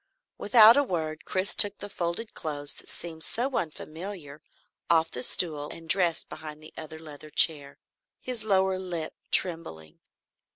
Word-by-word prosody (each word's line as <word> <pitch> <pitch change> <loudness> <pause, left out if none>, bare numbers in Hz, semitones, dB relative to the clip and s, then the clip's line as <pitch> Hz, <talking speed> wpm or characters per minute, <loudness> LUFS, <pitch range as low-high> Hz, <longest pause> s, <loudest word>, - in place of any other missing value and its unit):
Without 225 +2 +7
a 285 - +4
word, 160 - -4
Chris 190 +1 0
took 205 -1 +7
the 205 - -8
folded 185 +3 -4
clothes 145 -2 -2
that - - -8
seemed 160 -2 -6
so 255 +3 -1
unfamiliar 160 -1 -6 0.5
off 165 -1 +2
the 125 - -5
stool 150 +1 +1
and 165 -1 -11
dressed 175 -2 +1
behind 155 -1 -9
the 155 0 -15
other 160 0 -9
leather 155 -1 -11
chair, 145 -3 +3 0.4
his 250 -3 -4
lower 190 -2 +1
lip 175 -4 -5 0.2
trembling. 80 - -2
165 Hz, 150 wpm, -26 LUFS, 155-190 Hz, 0.5 s, Without